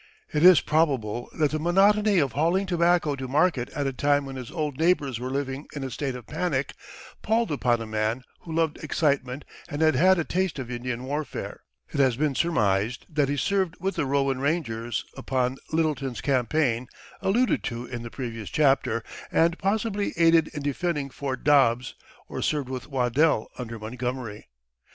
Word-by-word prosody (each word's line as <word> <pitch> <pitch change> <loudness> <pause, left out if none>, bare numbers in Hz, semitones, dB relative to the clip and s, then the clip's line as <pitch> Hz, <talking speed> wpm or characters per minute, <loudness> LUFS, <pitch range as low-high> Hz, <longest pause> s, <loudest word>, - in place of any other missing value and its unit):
It 150 - +1
is 180 -3 +9
probable 130 -8 0
that 150 -3 +2
the 155 - -1
monotony 200 +5 +4
of 140 -6 +2
hauling 170 - +1
tobacco 175 -4 +2
to 130 -1 -5
market 145 -2 +2
at 145 -3 -3
a 135 - -1
time 145 +2 +2
when 135 -1 -7
his 125 -3 -7
old 150 -4 -3
neighbors 150 -8 +2
were 125 +1 -4
living 135 +1 -3
in 140 - -4
a 130 - -4
state 135 +1 -3
of 125 -3 -9
panic 145 -3 -2 0.5
palled 225 -2 +1
upon 120 -5 +1
a - - -4
man 110 +3 -1 0.2
who 165 - -10
loved 160 -1 0
excitement 140 -3 0 0.2
and 145 +2 -1
had 155 -1 +5
had 185 +8 +5
a 170 - +1
taste 185 0 -1
of 125 -2 -5
Indian 125 0 -4
warfare. 145 +3 -4 0.3
It - - -2
has 130 -4 +4
been 145 +2 0
surmised 110 - +1
that 145 -4 +1
he 145 - -1
served 190 +3 0
with 195 +2 -1
the 140 - -1
Rowan 135 -1 +1
rangers 120 -6 -1
upon 130 0 -1
Lyttleton's 150 -6 -1
campaign, 130 -2 +1 0.3
alluded 240 +6 +2
to 120 0 -4
in 120 -1 -6
the 115 - -7
previous 115 -4 -6
chapter, 135 -6 +2 0.3
and 170 +1 +2
possibly 205 +1 0
aided 165 -1 +5
in 150 -2 -7
defending 145 -1 -1
Fort 130 -2 -4
Dobbs, 130 -4 +3 0.3
or - - -5
served 145 -4 -1
with 130 -1 -5
Waddell 130 0 +2
under 115 -2 -5
Montgomery. 120 - -5
140 Hz, 175 wpm, -26 LUFS, 125-160 Hz, 0.5 s, is